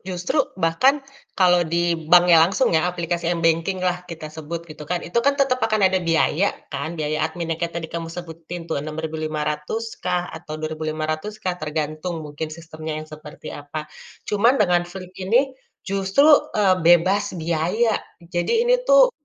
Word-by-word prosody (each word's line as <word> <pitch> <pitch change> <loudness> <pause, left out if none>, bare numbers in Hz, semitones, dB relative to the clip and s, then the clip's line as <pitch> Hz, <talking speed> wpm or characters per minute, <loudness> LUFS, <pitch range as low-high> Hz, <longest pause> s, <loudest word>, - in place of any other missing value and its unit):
justru 180 - 0 0.2
bahkan 255 - +2 0.3
kalau 180 -2 +5
di 170 +1 +1 0.2
banknya 175 -1 +7
langsung 190 +7 +3
ya 160 +2 +3
aplikasi 170 -1 -2
m-banking-lah 180 +2 0
kita 155 -2 -8
sebut, 160 +2 -6
gitu 155 -2 -11
kan, 175 -1 -2
itu 170 - -11
kan 280 +3 +2
tetep 260 -3 +1
akan 215 -2 +2
ada 185 - +2
biaya 165 +2 +1 0.2
kan, 150 +5 -4
biaya 155 0 -1
adminnya 165 -2 -4
kayak 170 0 -2
tadi 165 -1 -3
kamu 165 -1 -4
sebutin 170 0 -7
tuh 160 -4 -2
Rp6.500 155 +6 -3
kah 180 -1 0
atau 155 - -7
Rp2.500 155 +4 -3
kah, 185 -4 -2
tergantung 155 +2 -3
mungkin 150 +1 -5
sistemnya 155 -1 -7
yang 155 - -5
seperti 155 -1 -10
apa. 145 +1 -6 0.4
Cuma 230 +6 +3
dengan 175 -5 +2
Flip 185 0 -9
ini 240 +9 +2 0.3
justru, 195 +8 +2 0.3
eee, 190 -3 +3
bebas 175 +4 +3
biaya, 170 +8 +1 0.4
jadi 175 - 0
ini - - +3
tuh - - +7
170 Hz, 155 wpm, -22 LUFS, 155-190 Hz, 0.4 s, banknya